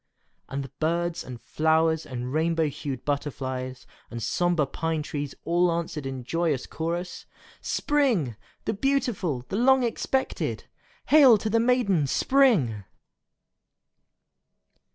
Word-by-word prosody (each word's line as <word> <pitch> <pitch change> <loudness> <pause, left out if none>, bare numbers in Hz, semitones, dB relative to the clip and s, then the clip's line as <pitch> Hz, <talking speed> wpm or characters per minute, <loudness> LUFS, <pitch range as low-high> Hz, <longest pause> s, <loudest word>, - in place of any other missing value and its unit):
And 135 -1 -5
birds 170 +2 -1
and 125 -2 -8
flowers 160 +7 +1
and 125 -1 -5
rainbow 160 0 +1
hued 140 -2 -6
butterflies 130 -3 -3 0.2
and 120 - -6
sombre 175 0 +1
pine 160 +2 -2
trees 145 -1 -5
all 175 +1 +2
answered 165 -4 -3
in 130 -1 -5
joyous 160 -1 -1
chorus, 170 +2 -4 0.3
"Spring! 240 - +1 0.3
the - - 0
beautiful, 200 - -1
the 195 - -2
long 260 +2 +4
expected! 265 +3 -1 0.5
Hail 275 -7 +8
to 215 +1 -3
the 230 - +3
maiden 225 - +2
Spring!" 175 - +3
165 Hz, 110 wpm, -26 LUFS, 135-205 Hz, 0.5 s, Hail